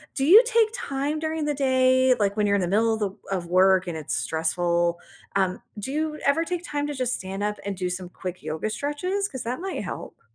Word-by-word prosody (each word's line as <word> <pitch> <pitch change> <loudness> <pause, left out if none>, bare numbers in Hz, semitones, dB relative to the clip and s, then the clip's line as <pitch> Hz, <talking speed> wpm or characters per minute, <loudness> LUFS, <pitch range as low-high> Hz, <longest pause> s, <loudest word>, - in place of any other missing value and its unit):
do 270 - 0
you 440 - +12 0.2
take 445 -1 +5
time 280 - -2
during 315 -1 -2
the 295 -1 0
day, 260 0 +4
like, 200 0 +1
when 210 - +2
you’re 200 0 +3
in - - 0
the 175 - 0
middle 225 +1 +3
of - - -6
the 195 - -3 0.3
of - - -3 0.2
work 190 -1 +5
and 165 -2 -3
it’s 130 -3 -3
stressful, 170 +3 0 0.6
um, 185 -1 +2 0.3
do - - -4
you 315 - +1 0.3
ever 325 +3 0
take 355 0 -3
time 290 0 0
to 295 - -3
just 250 0 +1
stand 190 +1 -5
up 210 - -4
and 200 - -2
do 180 - +1
some 180 -1 -9
quick 185 -1 -4
yoga 160 +7 -2
stretches? 360 +8 -2
'Cause 260 -3 -6
that 250 +5 -2
might 385 - -3
help. - - -10
240 Hz, 230 wpm, -25 LUFS, 185-290 Hz, 0.6 s, you